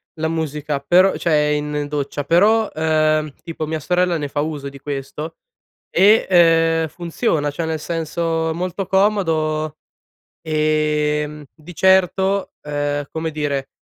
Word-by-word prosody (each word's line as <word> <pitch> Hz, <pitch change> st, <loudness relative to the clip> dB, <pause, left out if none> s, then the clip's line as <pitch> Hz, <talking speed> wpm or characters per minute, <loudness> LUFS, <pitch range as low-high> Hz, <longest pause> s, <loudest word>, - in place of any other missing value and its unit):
la 160 Hz, 0 st, -2 dB
musica, 150 Hz, -2 st, -2 dB
però 185 Hz, +5 st, +4 dB
cioè 165 Hz, -, 0 dB
in 150 Hz, 0 st, 0 dB
doccia, 145 Hz, -1 st, -3 dB
però, 210 Hz, +7 st, +4 dB
ehm, 155 Hz, -1 st, +1 dB
tipo, 160 Hz, -2 st, -5 dB
mia 160 Hz, +1 st, -3 dB
sorella 180 Hz, +2 st, +1 dB
ne 145 Hz, -2 st, -3 dB
fa 145 Hz, +1 st, -2 dB
uso 150 Hz, -2 st, -4 dB
di 140 Hz, 0 st, -9 dB
questo 145 Hz, +3 st, -6 dB, 0.5 s
e, 165 Hz, -5 st, +4 dB
uhm, -, -, -5 dB
funziona. 165 Hz, -2 st, -2 dB
Cioè, 160 Hz, +3 st, -3 dB
nel 160 Hz, -1 st, -2 dB
senso, 165 Hz, 0 st, -2 dB
molto 180 Hz, +3 st, -3 dB
comodo, 160 Hz, -6 st, +1 dB, 0.7 s
e, 150 Hz, -1 st, +1 dB
mhmm, 150 Hz, 0 st, -9 dB
di 160 Hz, +3 st, -12 dB
certo, 190 Hz, +2 st, +2 dB
ehm, 145 Hz, -1 st, -2 dB
come 160 Hz, 0 st, -4 dB
dire 145 Hz, -3 st, -2 dB
155 Hz, 135 wpm, -20 LUFS, 150-170 Hz, 0.7 s, però